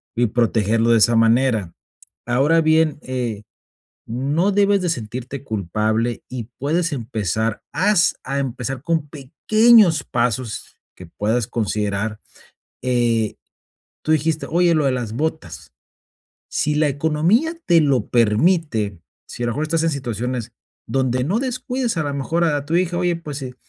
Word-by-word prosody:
Y 120 0 +2
protegerlo 115 0 +1
de 115 - +5
esa 115 +2 +4
manera. 115 -5 +2 0.5
Ahora 145 +7 +3
bien, 155 -1 +2
eh, 125 -5 -3 0.7
no 140 - 0
debes 200 0 +3
de 180 - 0
sentirte 125 +1 -5
culpable 110 +3 -1
y 120 -3 -6
puedes 165 +4 0
empezar. 110 - -2
Haz 185 +1 +3
a 135 +2 -2
empezar 130 -1 -4
con 160 -2 -1
pequeños 190 - +4
pasos 120 -1 -2 0.2
que 90 - -11
puedas 110 +6 -1
considerar, 105 -1 -2 0.6
eh, 120 -4 +1 0.7
tú 155 - -1
dijiste: 155 +1 0
"Oye, 170 +1 +3
lo 150 -2 +1
de 135 - +3
las 120 -4 -3
botas". 135 - -4 0.8
Si 150 0 0
la 150 0 +3
economía 160 - +1
te 170 -2 +5
lo 140 -4 +1
permite, 115 - +2 0.3
si - - -7
a 120 - 0
lo 120 - -1
mejor 145 +6 -3
estás 165 +1 0
en 165 - +2
situaciones 125 -3 -4 0.3
donde 130 -1 0
no 195 +9 0
descuides 255 - -2
a - - +1
la 145 - -2
mejor 160 +5 0
a 155 -3 +2
a 140 - -7
tu 165 - +1
hija. 175 -1 0
Oye, 175 -1 +1
pues, 150 -4 -7
eh, 125 -1 -6
135 Hz, 150 wpm, -20 LUFS, 115-160 Hz, 0.8 s, de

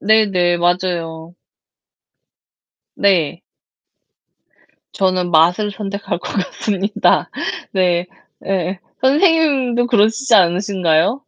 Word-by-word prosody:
네네. 195 -5 +2
맞아요. 170 -2 -2 1.6
네. 175 -3 +1 1.5
저는 185 -2 0
맛을 175 +6 +3
선택할 200 -2 -5
것 - - -7
같습니다. 200 +1 -1 0.4
네. 180 -2 +1 0.4
예. 185 -1 -2 0.2
선생님도 275 -4 +2
그러시지 230 +2 +2
않으신가요? 185 - +2
195 Hz, 175 characters per minute, -17 LUFS, 175-220 Hz, 1.6 s, 맛을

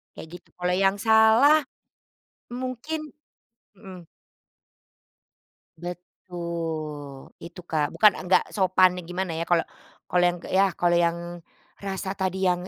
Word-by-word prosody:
Kayak - - -9
gitu, - - -32
kalau 180 0 0
yang 195 +1 +2
salah, 225 +7 +5 0.9
mungkin 255 +5 -5 0.6
mhm. 190 -3 -12 1.7
Betul, 165 -5 -7
itu, 170 +2 -10
Kak, 155 -3 -1
bukan 210 -2 +6 0.2
nggak 185 - +4
sopan 185 -1 +4 0.2
gimana 180 0 -3
ya, - - -1
kalau 170 -2 +3 0.5
kalau 180 0 +2
yang, 175 0 -1
ya 195 +1 +4
kalau 175 0 +3
yang 170 0 -1 0.6
rasa 190 -1 -5
tadi 190 0 -1
yang 180 0 -1
180 Hz, 115 wpm, -25 LUFS, 175-205 Hz, 1.7 s, bukan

